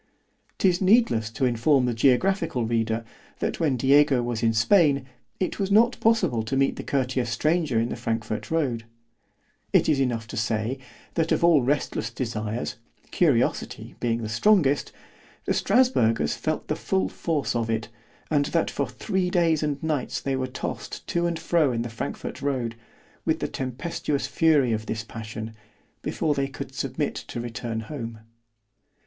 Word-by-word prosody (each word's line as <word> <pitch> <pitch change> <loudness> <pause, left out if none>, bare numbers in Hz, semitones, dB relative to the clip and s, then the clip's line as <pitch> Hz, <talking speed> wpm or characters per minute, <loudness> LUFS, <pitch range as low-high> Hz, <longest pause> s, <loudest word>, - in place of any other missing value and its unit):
_ - - -41 0.5
'Tis 185 -1 +2
needless 190 - +4
to 115 +4 -1
inform 125 +3 +3
the 120 - 0
geographical 135 - +2
reader, 115 0 0 0.3
that - - -2
when 145 -6 +1
Diego 135 0 +4
was 120 -2 -2
in 115 -1 +3
Spain, 140 - +4 0.3
it 185 - -2
was 195 -1 0
not 230 +4 +4
possible 220 - +2
to 110 +5 -2
meet 135 0 +2
the - - -5
courteous 130 -3 -1
stranger 155 +1 +1
in 115 +1 0
the - - -3
Frankfort 110 -2 -3
road; 130 -8 0 0.9
it - - +4
is 150 -3 +3
enough 120 -4 0
to 110 - -8
say, 110 +3 -1 0.3
that 165 -1 0
of - - +2
all 170 -4 +6
restless 130 -3 -1
desires, 115 -2 -3 0.3
curiosity 140 -9 +1
being 115 -1 -1
the - - -2
strongest——the 145 - 0
Strasburgers 115 - +3
felt - - -3
the - - 0
full 95 0 0
force 150 - -2
of 115 -1 -1
it; 110 -1 -1 0.4
and 145 -2 +3
that 165 +2 0
for - - -1
three 190 -4 -1
days 170 -3 +2
and 150 -1 -2
nights 155 -5 -1
they 135 -1 -1
were 130 0 -1
tossed 130 - -6
to 170 0 0
and 170 -1 -2
fro 160 -4 +2
in 115 -1 -1
the 120 - -5
Frankfort 115 - -5
road, 130 -5 -1 0.5
with - - +1
the - - -1
tempestuous 135 +2 -3
fury 145 -3 +3
of 110 0 -3
this 110 -1 -3
passion, 110 -1 -7 0.5
before 155 - 0
they 140 -1 0
could 135 - -8
submit - - -2
to - - -6
return 115 -1 -4
home. 115 -3 -7
130 Hz, 165 wpm, -25 LUFS, 115-160 Hz, 0.9 s, all